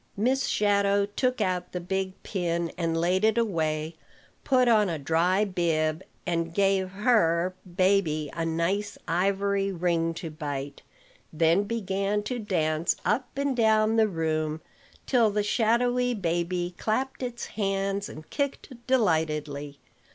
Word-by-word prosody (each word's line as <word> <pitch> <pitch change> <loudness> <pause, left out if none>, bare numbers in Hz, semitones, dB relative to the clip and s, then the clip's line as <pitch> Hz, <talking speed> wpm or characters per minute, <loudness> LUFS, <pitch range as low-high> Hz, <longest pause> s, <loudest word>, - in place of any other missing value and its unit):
Miss 260 +6 +1
Shadow 200 -1 +2
took 250 +5 -1
out 180 -1 -1
the 180 - -2
big 190 +1 -2
pin 170 -3 -2
and 165 -2 -1
laid 180 +4 +1
it 220 +1 +3
away, 160 -7 -1 0.5
put 255 -2 +3
on 215 -4 +4
a 165 - -2
dry 170 +7 +2
bib, 165 -4 0 0.2
and 170 -2 -1
gave 195 -1 +2
her 185 -5 +2 0.2
baby 185 -6 +2
a 165 - -2
nice 170 +6 -1
ivory 195 +3 +1
ring 170 -2 0
to 165 -1 -6
bite; 145 -2 -5 0.5
then 165 +5 +3
began 200 -1 -1
to 245 +3 -3
dance 165 -6 0
up 250 +2 0
and 280 -1 0
down 220 -1 +3
the 220 -1 +4
room, 160 -3 -1 0.4
till 235 -4 +3
the 210 0 0
shadowy 245 +3 +2
baby 175 -1 -1
clapped 260 +6 -1
its 245 -1 -4
hands 195 -1 -2
and 155 0 -10
kicked 280 -1 -3
delightedly. 155 - 0
190 Hz, 135 wpm, -27 LUFS, 165-215 Hz, 0.5 s, on